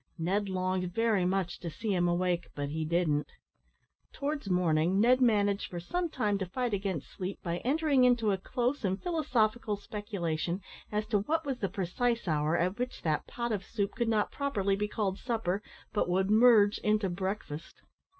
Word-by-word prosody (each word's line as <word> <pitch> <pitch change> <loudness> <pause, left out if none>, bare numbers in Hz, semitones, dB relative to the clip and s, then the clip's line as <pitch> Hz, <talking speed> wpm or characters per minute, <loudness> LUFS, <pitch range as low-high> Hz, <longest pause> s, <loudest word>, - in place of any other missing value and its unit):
Ned 195 +5 0
longed 185 -1 -1
very 225 -5 +2
much 185 -1 -1
to 170 - -5
see 200 +7 -2
him 175 -1 +2
awake, 175 0 0
but 145 -1 -3
he 155 +1 -2
didn't. 155 -3 +1 0.8
Towards 285 -6 -3
morning, 180 0 +2
Ned 250 +4 +5
managed 205 -4 +3
for 175 - -5
some 350 - -2
time 210 -8 0
to 190 - -1
fight 245 +5 -2
against 190 -6 -2
sleep, 190 +1 -5
by 170 -1 -1
entering 280 - +2
into 240 -4 +4
a 190 - 0
close 245 +7 -1
and 190 0 0
philosophical 240 - 0
speculation, 185 -5 -3 0.3
as 210 0 0
to 210 -3 +3
what 320 +10 -1
was 270 -3 -2
the 195 - -1
precise 200 +6 -1
hour 155 +1 +1
at 180 +5 0
which 250 0 -4
that 155 -2 0
pot 235 -1 -3
of 205 -3 -1
soup 200 -1 -2
could 235 -1 -1
not 215 -2 +1
properly 205 -9 0
be 210 +1 -1
called 205 -2 -2
supper, 220 -6 -1 0.3
but 205 - +1
would 190 +2 +1
merge 215 -2 +6
into 210 -1 +1
breakfast. 185 -4 -5
200 Hz, 180 wpm, -30 LUFS, 180-230 Hz, 0.8 s, merge